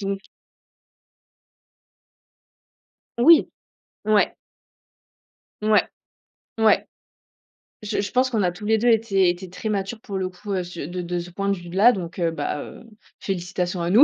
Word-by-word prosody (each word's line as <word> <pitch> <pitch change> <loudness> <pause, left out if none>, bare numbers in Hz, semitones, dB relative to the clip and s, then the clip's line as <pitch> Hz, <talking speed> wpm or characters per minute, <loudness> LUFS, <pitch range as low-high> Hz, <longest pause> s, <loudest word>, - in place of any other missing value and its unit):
Donc 195 -1 -2 3.0
Oui, 320 +6 +7 0.6
ouais. 215 -1 +3 1.3
Ouais, 215 0 +4 0.8
ouais, 220 -1 +4 1.0
je 210 - -2
je 200 - -4
pense 255 +1 +2
qu'on 220 -5 0
a 180 - +2
tous 185 +4 -10
les 220 +1 +3
2 235 +3 0
été 210 -5 +3
été 175 +1 -4
très 215 +4 -5
matures, 200 +2 -2
pour 200 -4 -5
le 185 -1 -2
coup, 190 0 -4
sur 175 -4 -7
de 180 +1 -4
de 175 0 -3
ce 175 +1 -8
point 200 +2 -2
de 195 - +1
vue 175 0 -10
d 175 - -8
là, 215 +6 +7
donc 180 -5 -5
heu, 165 -1 +1
bah, 145 -1 -3
heu, - - -10 0.4
félicitations 180 -1 -3
à 170 - -1
nous, 220 +9 +8
195 Hz, 155 wpm, -23 LUFS, 175-215 Hz, 3.0 s, nous